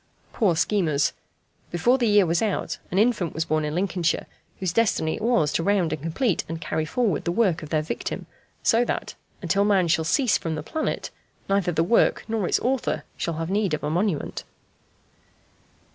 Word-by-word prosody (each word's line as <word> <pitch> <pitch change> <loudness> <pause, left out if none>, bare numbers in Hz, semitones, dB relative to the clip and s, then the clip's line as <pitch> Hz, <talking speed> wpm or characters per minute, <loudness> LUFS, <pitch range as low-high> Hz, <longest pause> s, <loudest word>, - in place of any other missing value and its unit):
Poor 195 -8 +2
schemers! 155 -3 +1 0.6
Before 240 +10 +2
the 240 - +2
year 205 -2 +5
was 170 0 +1
out 215 -3 -1
an 180 - -2
infant 210 -6 +2
was 160 +1 -1
born 155 0 0
in 150 +1 -2
Lincolnshire, 180 -2 0 0.3
whose 185 -3 -1
destiny 195 -7 +1
it - - -9
was 215 -10 +2
to - - +1
round 180 -3 +1
and 155 - -5
complete 165 - 0
and 165 0 -4
carry 160 -1 -2
forward 205 - 0
the 170 - -1
work 185 -4 +2
of 155 - -8
their 155 -1 +1
victim, 155 - -4 0.4
so 230 +2 +4
that, - - -3 0.3
until 190 +4 +2
man 195 -4 +3
shall 160 -1 +2
cease 240 - +2
from 165 -1 -3
the 155 - -5
planet, 315 - -3 0.4
neither 195 -2 +1
the 165 0 +1
work 230 +7 +3
nor 220 -5 -1
its - - +2
author 260 0 -1
shall 170 - -3
have 165 +2 -3
need 200 -5 +1
of - - -9
a 150 - -1
monument. 180 -2 -1
175 Hz, 190 wpm, -24 LUFS, 160-210 Hz, 0.6 s, year